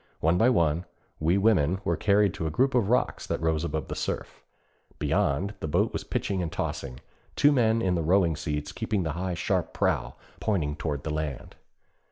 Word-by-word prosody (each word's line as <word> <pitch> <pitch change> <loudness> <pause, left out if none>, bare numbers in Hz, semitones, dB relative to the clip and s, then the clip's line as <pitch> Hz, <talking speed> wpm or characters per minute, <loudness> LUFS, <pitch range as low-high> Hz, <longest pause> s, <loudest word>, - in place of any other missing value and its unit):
One 80 +2 +3
by 115 - +5
one, 85 -6 +2 0.3
we 85 +5 +2
women 95 -4 +3
were - - +1
carried 100 -2 +3
to 80 -4 -3
a - - -1
group 130 - +1
of 120 -5 +2
rocks 125 - +1
that - - -1
rose 80 -1 0
above 80 -3 -3
the - - -4
surf. - - -4 0.6
Beyond, 95 +9 0
the - - -3
boat 75 - +1
was - - -3
pitching 95 -2 -2
and 85 -3 -3
tossing, 65 -2 -4 0.3
two 145 - +5
men 115 -4 +2
in 95 -1 +2
the 85 - 0
rowing 85 0 +3
seats 75 -2 -3
keeping 100 -4 -1
the 80 - -2
high 90 +3 -3
sharp - - -1
prow - - 0 0.2
pointing 80 -9 0
toward 75 -3 -3
the 80 - -3
land. 75 -4 -4
85 Hz, 195 wpm, -27 LUFS, 75-100 Hz, 0.6 s, by